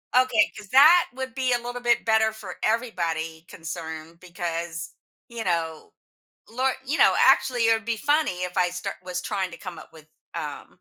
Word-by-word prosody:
Okay, 250 -4 +4
'cause 210 -2 -11
that 310 - +7
would 260 0 -6
be 260 -2 +1
a - - +3
little 245 +1 -6
bit 240 0 +2
better 220 -1 +3
for 205 -5 -9
everybody 170 -8 -1
concerned 160 0 -8
because, 170 -1 -5 0.3
you 235 -1 -6
know 165 - -2 0.6
lor 260 +3 +1
you 285 +5 -2
know, - - +6
actually, 250 -2 +4
it - - +6
would 225 0 0
be 230 -1 -1
funny 290 - +1
if 180 0 -4
I 180 -1 +3
start 180 0 -5
was 180 0 -4
trying 190 -3 -2
to - - -8
come 185 -3 -8
up - - -13
with, 155 -1 -15 0.3
um - - -6
205 Hz, 185 wpm, -25 LUFS, 170-245 Hz, 0.6 s, that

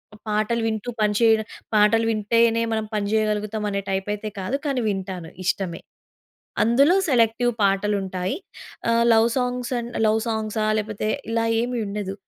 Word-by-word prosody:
ఆ - - -15
పాటలు 215 +2 0
వింటూ 220 +2 -3
పని 210 0 +3
చేయడం. 220 -2 +4 0.3
పాటలు 215 +2 +4
వింటేనే, 230 +2 +2
మనం 220 -1 -1
పని 210 -1 0
జేయగలుగుతాం 215 0 0
అనే 200 0 -2
టైపైయితే 205 +2 -2
కాదు 190 +8 -2
కానీ 270 -4 0
వింటాను 190 -4 -4
ఇష్టమే. 185 -2 -1 0.8
అందులో 275 +9 +4
సెలెక్టివ్ 240 -2 +3
పాటలు 200 +1 +2
ఉంటాయి. 185 0 -3 0.5
ఆహ్, 230 0 +3
లవ్ 225 +1 +5
సాంగ్స్ 250 -1 -1
అండ్ 235 0 -6
లవ్ 220 +1 +2
సాంగ్సా? 215 -1 -1
లేకపోతే 215 0 -3 0.2
ఇలా 230 0 +1 0.2
ఏమి 245 0 -2
ఉండదు. 200 -1 -4
215 Hz, 145 wpm, -23 LUFS, 205-230 Hz, 0.8 s, లవ్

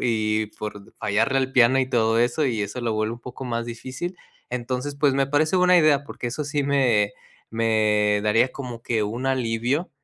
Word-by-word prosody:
y 110 -2 0
por 105 -2 -8
fallarle 110 +6 +1
al 130 -1 0
piano 130 +1 +5
y 130 - 0
todo 115 -1 +2
eso, 125 +5 +1
y 115 -4 -1
eso 105 +5 -5
lo 115 -2 -1
vuelve 110 +1 -1
un 120 - -13
poco 125 +2 -8
más 115 -1 -3
difícil. 130 +10 -6 0.3
Entonces 125 +3 -3
pues, 140 -2 +2
me 135 0 +2
parece 155 +5 +1
buena 180 0 +5
idea, 150 -4 +4
porque 125 - -5
eso 145 +5 -4
sí 145 0 -1
me 125 -7 +2 0.4
me 105 -2 +2
daría 115 +4 +2
como 125 -4 -7
que 115 -3 0
un 115 +5 -3
alivio, 130 +4 0
120 Hz, 190 wpm, -24 LUFS, 110-135 Hz, 0.4 s, piano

